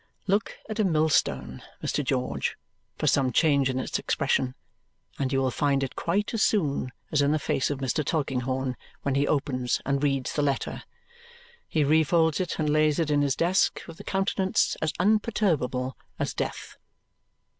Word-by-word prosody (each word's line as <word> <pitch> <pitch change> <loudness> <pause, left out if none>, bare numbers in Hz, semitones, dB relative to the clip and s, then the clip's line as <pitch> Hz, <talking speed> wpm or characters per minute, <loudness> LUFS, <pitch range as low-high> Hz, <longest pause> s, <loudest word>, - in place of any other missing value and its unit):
Look 200 +2 0
at 215 0 -5
a - - +4
millstone, 155 - +1 0.2
Mr. 145 - 0
George, 125 - -1 0.4
for - - -2
some 135 -2 +3
change 140 0 +3
in 130 - -1
its 130 - -2
expression, 130 -1 0 0.6
and 135 -2 0
you 135 - +2
will 130 -1 +1
find 140 +1 +1
it 135 - -4
quite 200 +7 -1
as 225 - 0
soon 145 - +1 0.2
as 150 - +3
in 140 0 +3
the 155 - +3
face 140 -2 0
of 145 - -2
Mr. 135 +3 -1
Tulkinghorn 130 -3 -1 0.3
when 140 - 0
he 140 +1 +2
opens 130 -4 0
and 140 0 0
reads 135 -3 0
the 150 - 0
letter! 140 -2 -1 0.9
He 155 - +1
refolds 160 +2 +3
it 180 - -3
and 155 - 0
lays 155 0 +3
it 160 -3 0
in 145 -1 +3
his 140 -2 +1
desk 180 +3 +2
with 165 -1 -11
a - - -8
countenance 190 0 +1
as 155 - +1
unperturbable 180 - +1 0.2
as - - -2
death. - - -4
145 Hz, 170 wpm, -27 LUFS, 135-165 Hz, 0.9 s, a